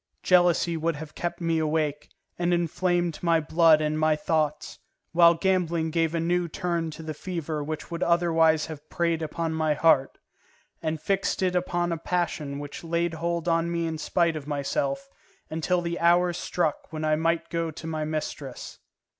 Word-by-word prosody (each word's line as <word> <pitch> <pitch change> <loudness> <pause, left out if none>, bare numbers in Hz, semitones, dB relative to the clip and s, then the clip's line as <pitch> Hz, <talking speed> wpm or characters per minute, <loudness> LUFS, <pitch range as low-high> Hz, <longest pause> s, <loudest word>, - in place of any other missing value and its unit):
Jealousy 175 -1 +4
would 165 0 -1
have 155 +1 -8
kept 175 - -4
me 165 -1 +1
awake, 150 -1 -1 0.3
and 175 0 +2
inflamed 175 0 0
my 170 -2 +3
blood 160 0 +4
and 155 0 0
my 155 0 +3
thoughts; 155 0 -1 0.3
while 170 0 +6
gambling 170 -3 0
gave 165 0 +1
a - - +1
new 175 +1 +1
turn 170 -1 -2
to 160 +1 -9
the 155 0 -4
fever 160 -2 -4
which 155 +2 -6
would 170 0 -4
otherwise 165 -2 +3
have 155 -1 -10
preyed 170 -1 0
upon 160 +1 -2
my 155 -1 +1
heart, 145 -3 +3 0.6
and 160 -1 -2
fixed 195 +3 0
it 180 -1 +1
upon 175 -1 0
a 165 - -2
passion 165 -5 -2
which 145 +2 -7
laid 170 0 0
hold 170 +1 -2
on 165 0 +1
me 170 -1 -1
in 160 -1 -3
spite 170 +2 +1
of 150 -2 -6
myself, 275 - -2 0.4
until 170 +3 0
the 170 0 -3
hour 175 +1 +4
struck 170 -3 -2
when 155 -1 -3
I 155 0 +3
might 165 +1 0
go 165 -1 -1
to 160 +1 -9
my 160 -1 -2
mistress. 150 -4 -5
165 Hz, 175 wpm, -26 LUFS, 155-175 Hz, 0.6 s, while